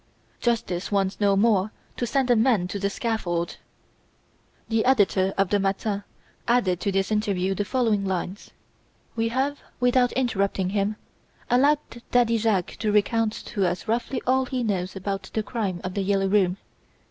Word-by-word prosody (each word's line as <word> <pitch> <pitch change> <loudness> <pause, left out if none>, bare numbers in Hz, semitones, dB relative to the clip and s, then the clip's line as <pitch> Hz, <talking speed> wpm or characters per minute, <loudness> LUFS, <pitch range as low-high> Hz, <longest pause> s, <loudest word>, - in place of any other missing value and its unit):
Justice 215 -6 -1
wants 195 -1 0
no 200 -1 +3
more 205 -1 +3 0.2
to 240 - -2
send 260 +1 +1
a - - +6
man 220 -5 +3
to 200 - -4
the 200 0 0
scaffold!'" 190 -7 -2 1.1
The 225 -1 +1
editor 200 -6 +3
of 195 -2 +2
the 205 - +2
"Matin" 200 +1 -1 0.4
added 220 -8 +2
to 200 - -1
this 195 +1 0
interview 195 -3 0
the 200 +2 -2
following 225 -4 +1
lines: 190 +1 -3 0.7
"We 225 0 +1
have, 265 +5 -1 0.2
without 245 0 +3
interrupting 200 -7 0
him, 205 +1 0 0.6
allowed 275 -1 +2
Daddy 235 -2 +3
Jacques 210 -5 0
to 215 -2 0
recount 215 +1 +2 0.2
to 200 - +1
us 175 +3 -3
roughly 240 +3 -1
all 260 +1 +2
he 255 -2 -2
knows 190 -4 -2
about 195 0 -4
the 220 - +1
crime 205 -6 -3
of 185 - -4
"The 200 - -1
Yellow 195 0 +1
Room". 190 -2 +2
210 Hz, 160 wpm, -25 LUFS, 195-235 Hz, 1.1 s, a